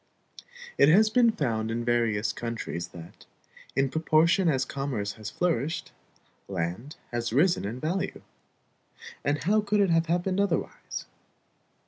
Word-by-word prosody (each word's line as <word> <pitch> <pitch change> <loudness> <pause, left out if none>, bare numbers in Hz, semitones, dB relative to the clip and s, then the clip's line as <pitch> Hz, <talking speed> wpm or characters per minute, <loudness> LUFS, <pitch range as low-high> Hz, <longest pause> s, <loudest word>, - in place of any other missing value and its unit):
It 140 - +7
has 215 +6 +5
been 235 -1 +5
found 115 - -1
in 115 +1 -2
various 115 -3 +1
countries 115 -7 -4
that, 85 -1 -13 0.5
in 135 0 +3
proportion 165 +4 +3
as 130 -3 +1
commerce 130 -8 -3
has 110 -1 -7
flourished, 160 -3 -1 0.6
land 95 - -4 0.2
has 120 -1 -2
risen 170 - +3
in 115 +5 -4
value. 185 +7 -2 1.0
And 145 +1 0
how 210 +5 +3
could 205 0 0
it 195 -3 +3
have 165 0 +3
happened 180 +3 0
otherwise? 200 - -2
140 Hz, 130 wpm, -27 LUFS, 115-180 Hz, 1.0 s, It